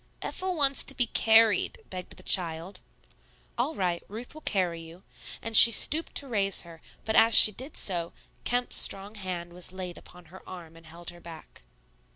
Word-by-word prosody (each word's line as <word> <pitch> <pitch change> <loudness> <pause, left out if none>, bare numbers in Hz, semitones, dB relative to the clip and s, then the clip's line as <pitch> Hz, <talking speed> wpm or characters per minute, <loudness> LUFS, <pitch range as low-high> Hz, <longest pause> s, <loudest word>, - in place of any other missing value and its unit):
"Ethel 370 -1 -4
wants 275 -3 +2
to 270 - -1
be 245 - +3
carried," 220 -3 +2
begged 185 -1 -9
the - - -13
child. 170 +1 -2 0.8
"All 260 +7 -3
right; 180 -4 -2
Ruth 225 +4 -10
will 310 - -13
carry 180 - -2
you," 165 +3 -15 0.4
and 225 0 -5
she 230 - +11
stooped 300 +8 -1
to 280 - -1
raise 200 -5 -1
her; 165 -2 -15 0.2
but 220 - -2
as 225 -1 +4
she 215 - +8
did 260 +8 -7
so, 170 -3 -3 0.3
Kemp's 245 0 +2
strong 195 +2 +3
hand 180 -4 -8
was 180 0 -6
laid 185 -2 -9
upon 180 -1 -18
her 190 - -13
arm 170 -3 -12
and 165 -1 -17
held 170 +1 -10
her 175 0 -17
back. 165 - -14
190 Hz, 185 wpm, -26 LUFS, 175-230 Hz, 0.8 s, she